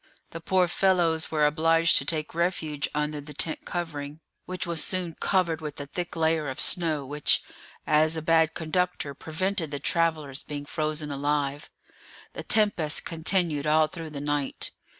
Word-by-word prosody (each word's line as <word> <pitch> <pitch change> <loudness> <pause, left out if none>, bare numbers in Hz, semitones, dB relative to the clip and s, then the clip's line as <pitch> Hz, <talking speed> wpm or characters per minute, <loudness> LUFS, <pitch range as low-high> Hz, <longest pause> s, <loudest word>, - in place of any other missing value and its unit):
The 165 - -7
poor 185 +1 +3
fellows 175 -3 +2
were 155 -2 +2
obliged 165 +2 +3
to - - -1
take 155 -2 -1
refuge 160 -4 -1
under 150 0 -1
the 145 0 -11
tent 160 +2 -1
covering, 150 -4 -4 0.3
which 185 0 -3
was 170 -3 +1
soon 180 -3 -2
covered 170 -2 0
with 150 -2 -6
a 145 - -4
thick 175 +5 -5
layer 160 -2 +1
of 130 - -6
snow, 160 -6 +2
which, 145 +2 +2 0.4
as 155 +1 +3
a - - -2
bad 160 0 +3
conductor, 170 -2 -1
prevented 165 +4 -2
the 145 - -4
travellers 155 -5 0
being 145 -1 -6
frozen 155 0 -2
alive. 145 0 -1 0.6
The - - -5
tempest 205 -8 +2
continued 160 -3 0
all 155 +1 +5
through 165 0 -7
the 145 -2 -6
night. 145 -1 -2
160 Hz, 160 wpm, -27 LUFS, 150-170 Hz, 0.6 s, all